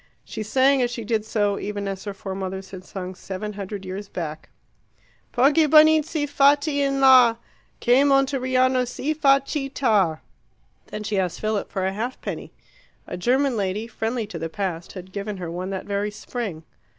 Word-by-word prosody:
She - - -6
sang 260 +5 +3
as 245 - +1
she 235 -1 -5
did 220 -1 -1
so, 205 -2 0
even 205 -1 -4
as 195 0 -5
her 205 - -4
foremothers 190 -1 -5
had 185 -1 -8
sung 185 0 -6
seven 195 +3 -6
hundred 200 -1 -6
years 195 +2 -6
back 155 -3 -6 0.8
Poggibonizzi, 310 +3 +4
fatti 285 +1 +3
in 275 -1 +1
la, 255 -3 +7 0.4
Che 245 +3 +4
Monteriano 260 -2 +2
si 290 +5 -2
fa 275 -3 +4
citta! 235 - 0 0.7
Then 215 - -6
she 210 -2 -1
asked 180 -3 -2
Philip 215 -1 -2
for 190 -1 -1
a 190 - -1
halfpenny. 235 +5 -5 0.5
A - - -6
German 255 +7 +1
lady, 205 +1 -2
friendly 230 0 -3
to 185 -5 -7
the 165 +1 -4
Past, 175 -3 -4
had 185 -1 -9
given 200 +1 -4
her 175 -3 -5
one 180 +2 -4
that 190 -1 -4
very 200 +1 -1
spring. 210 -5 -6
215 Hz, 165 wpm, -23 LUFS, 190-265 Hz, 0.8 s, la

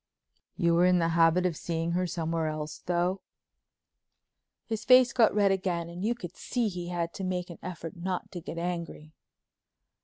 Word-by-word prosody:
"You 170 -2 +3
were 175 +2 +5
in 180 0 +4
the 165 -1 +2
habit 165 +2 +4
of 175 -3 0
seeing 165 +1 -2
her 180 +1 0
somewhere 165 -1 -1
else, 155 -1 -4
though?" 180 +2 0 1.4
His 220 -1 -3
face 255 +1 +6
got 235 -4 +5
red 200 -2 +4
again 180 -3 -1
and 175 +2 -7
you 235 +3 +1
could 180 -6 -8
see 240 -3 -1
he 180 -2 -5
had 170 -1 -2
to 195 - -6
make 180 -1 -2
an 170 - -11
effort 165 -3 -7
not 180 +1 -4
to 175 - -6
get 170 - -7
angry. 170 -3 -4
175 Hz, 180 wpm, -29 LUFS, 170-185 Hz, 1.4 s, face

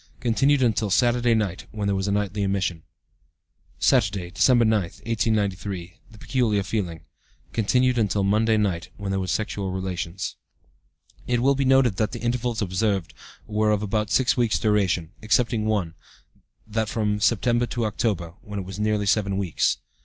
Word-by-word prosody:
(Continued 135 +3 +2
until 110 -3 +1
Saturday 120 +2 +3
night, 100 -5 -2
when 105 -2 -3
there 100 - +1
was 95 +1 -1
a - - 0
nightly 105 0 -1
emission.) 95 -4 -1 1.0
"Saturday, 95 -3 +1
December 120 +3 +4
9, 110 -1 +3
1893. 100 -2 -2
The 110 - -16
peculiar 110 -5 0
feeling. 90 -6 -3 0.5
(Continued 125 +3 +2
until 100 -2 +1
Monday 110 +3 +2
night, 95 -5 -1
when 100 -1 -4
there 95 - 0
was 95 -1 -3
sexual 100 -2 -2
relations.) 90 -7 -4 0.9
"It 120 -1 +1
will 135 +3 +3
be 135 0 0
noted 130 -6 +4
that 105 0 0
the - - -5
intervals 120 -2 -1
observed 95 -1 -1 0.3
were 105 0 0
of 105 -1 +1
about 105 0 -1
six 130 +4 +3
weeks' 120 -5 +2
duration, 95 -6 +1
excepting 115 0 +1
one, 100 -7 0 0.7
that 110 0 -2
from 105 -2 -1
September 120 +3 +2
to 120 0 -2
October, 100 -6 -2
when 105 -1 -7
it 95 - -4
was 95 +2 -8
nearly 105 -1 +1
seven 100 -1 +1
weeks. 95 -4 0
105 Hz, 160 wpm, -24 LUFS, 95-115 Hz, 1.0 s, December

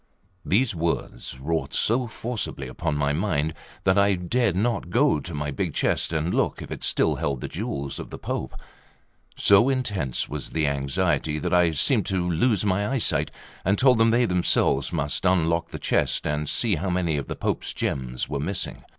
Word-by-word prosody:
These 115 +4 +2
words 80 -7 -3
wrought 80 +4 -2
so 120 +3 +2
forcibly 110 - -4
upon 65 +3 -2
my 70 0 +1
mind 80 -3 0 0.3
that 95 +1 +4
I 100 0 +4
dared 95 +3 0
not 110 -2 0
go 135 +9 +3
to 85 - -7
my 75 0 -2
big - - -3
chest - - 0
and 80 +2 -1
look - - 0
if - - -8
it - - -5
still - - +2
held 70 -3 -1
the - - -4
jewels 70 -1 -4
of - - -7
the - - -7
Pope. - - -4 0.8
So 100 +6 +5
intense 100 - -1
was 75 -2 -6
the 80 -1 0
anxiety, 75 +2 0
that 75 - -2
I 90 -1 +5
seemed 80 -4 +1
to 90 -2 0
lose 100 +4 +1
my 100 +1 +1
eyesight, 130 -3 +1 0.3
and 100 +3 +2
told 130 -3 +5
them 115 0 +5
they 120 +2 +3
themselves 85 - +2
must 70 -1 -2
unlock 85 -2 +2
the - - -6
chest, - - 0
and 75 0 -1
see 110 -7 +1
how 95 +5 -2
many 90 -3 0
of 70 - -4
the - - -4
Pope's - - -2
gems 65 -1 -3
were 70 - -3
missing. 90 +6 -3
90 Hz, 185 wpm, -25 LUFS, 75-105 Hz, 0.8 s, So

